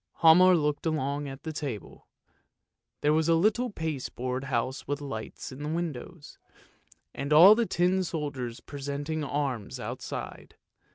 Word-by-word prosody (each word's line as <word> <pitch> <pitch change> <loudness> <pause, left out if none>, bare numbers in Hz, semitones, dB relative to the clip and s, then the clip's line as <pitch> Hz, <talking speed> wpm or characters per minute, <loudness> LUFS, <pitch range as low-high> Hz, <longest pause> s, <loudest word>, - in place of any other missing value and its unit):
" - - -29
Hialmar 180 +2 +7
looked 150 +1 -1
along 145 -2 -1
at 135 0 -9
the 160 - -5
table; 140 -9 -6 0.9
there 150 +1 +3
was 160 0 +2
the 165 - +5
little 220 +7 +2
pasteboard 130 - -4
house 130 0 -2
with 145 +1 -2
lights 135 -5 -6
in 130 +2 -9
the 150 - -3
windows, 165 -1 -5 0.7
and 140 +2 -5
all 170 +7 +10
the 230 0 +1
tin 185 +2 +2
soldiers 140 -8 -4
presenting 145 +2 -4
arms 140 -7 -3
outside. - - -6
150 Hz, 145 wpm, -28 LUFS, 135-165 Hz, 0.9 s, all